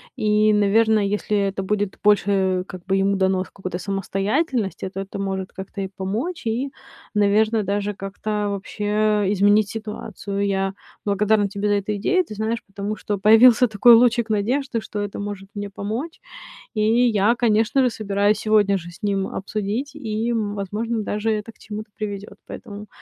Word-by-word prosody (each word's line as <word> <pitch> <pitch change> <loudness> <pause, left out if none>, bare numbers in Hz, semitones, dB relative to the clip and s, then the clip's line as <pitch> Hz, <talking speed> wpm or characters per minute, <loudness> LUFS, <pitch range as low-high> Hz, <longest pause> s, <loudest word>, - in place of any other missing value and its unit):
И, 215 -2 +3
наверное, 215 +1 +3
если 205 +1 0
это 195 -1 -1
будет 205 0 -2
больше, 195 -3 +2
как 185 -2 -10
бы, 195 - +1
ему 195 +1 +2
дано 190 -1 +2
сколько-то 185 -1 -6
самостоятельности, 195 - -1
то 195 +1 -5
это 195 +1 -7
может 190 -1 -3
как-то 195 +1 -7
и 190 - -3
помочь, 215 - -4
и, 255 +5 -1 0.4
наверное, 215 +1 +3
даже 205 +1 -1
как-то 205 +2 -3
вообще 200 +1 -5 0.5
изменить 205 +1 +4
ситуацию. 210 -2 -4
Я 195 0 0 0.3
благодарна 205 0 +2
тебе 200 +1 -2
за 205 - +2
эту 205 +1 -1
идею, 370 - +2
ты 215 - -9
знаешь, 220 +2 -2
потому 200 +1 -4
что 210 -1 -3
появился 225 +5 +6
такой 225 +2 +7
лучик 235 -1 +3
надежды, 235 +4 0
что 210 -1 -6
это 205 -1 -5
может 200 -1 -6
мне 205 0 -4
помочь. 220 - -5 0.5
И 215 - 0 0.3
я, 215 +2 +3
конечно 225 +2 +2
же, 250 - +3
собираюсь 205 -1 +1
сегодня 210 -2 +3
же 175 -2 -7
с 175 - -16
ним 195 -2 0
обсудить 215 +8 -3
и, 225 -5 -2
м, 210 -3 -2
возможно, 215 +3 -2
даже 210 +2 -1
это 215 +1 -3
к - - -32
чему-то 215 +1 -8
приведёт. 205 -1 -6
Поэтому 210 -3 -9
205 Hz, 165 wpm, -22 LUFS, 195-220 Hz, 0.5 s, такой